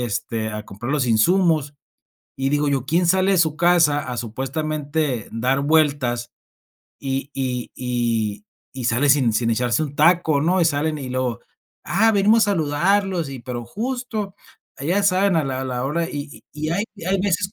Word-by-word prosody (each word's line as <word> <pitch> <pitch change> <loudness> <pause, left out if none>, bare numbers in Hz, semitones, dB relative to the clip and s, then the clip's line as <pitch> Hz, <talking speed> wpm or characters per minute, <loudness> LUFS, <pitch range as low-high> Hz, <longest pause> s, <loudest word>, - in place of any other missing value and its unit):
este, 110 0 -3
a 105 0 -6
comprar 115 +7 -7
los 145 -4 +1
insumos. 150 - +2 0.6
Y 135 0 -1
digo 145 0 +1
yo: 140 -2 0
"¿Quién 170 +3 +2
sale 190 +2 +3
de 190 - +3
su 160 -2 +2
casa 170 -4 +4
a 125 - -4
supuestamente 140 +2 -3
dar 125 +4 0
vueltas 140 -5 +1 0.7
y 135 0 -3
y 125 -2 -3
y 120 - -1 0.3
y 130 -2 -6
sale 130 +4 +2
sin 135 -5 +3
sin 115 +1 +1
echarse 120 +4 +1
un 145 - -7
taco?", 160 -1 +3
¿no?, 180 +4 +2
y - - +4
salen 155 0 0
y 130 -3 -6
luego: 125 -3 -2 0.4
"Ah, 220 +5 +3
venimos 210 +2 +4
a 205 - +3
saludarlos", 175 +1 +1
y 135 - -7
pero 120 -1 -6
justo 220 - -4 0.5
ya 180 +8 +1
saben 190 -1 +3
a 155 - +2
la 130 -1 -3
a - - -4
la 125 -1 -3
hora 165 +4 -1
y 145 0 -7
y 155 +1 -4
hay 200 +6 0 0.2
hay 195 0 +1
veces 195 +1 0
145 Hz, 175 wpm, -22 LUFS, 125-175 Hz, 0.7 s, casa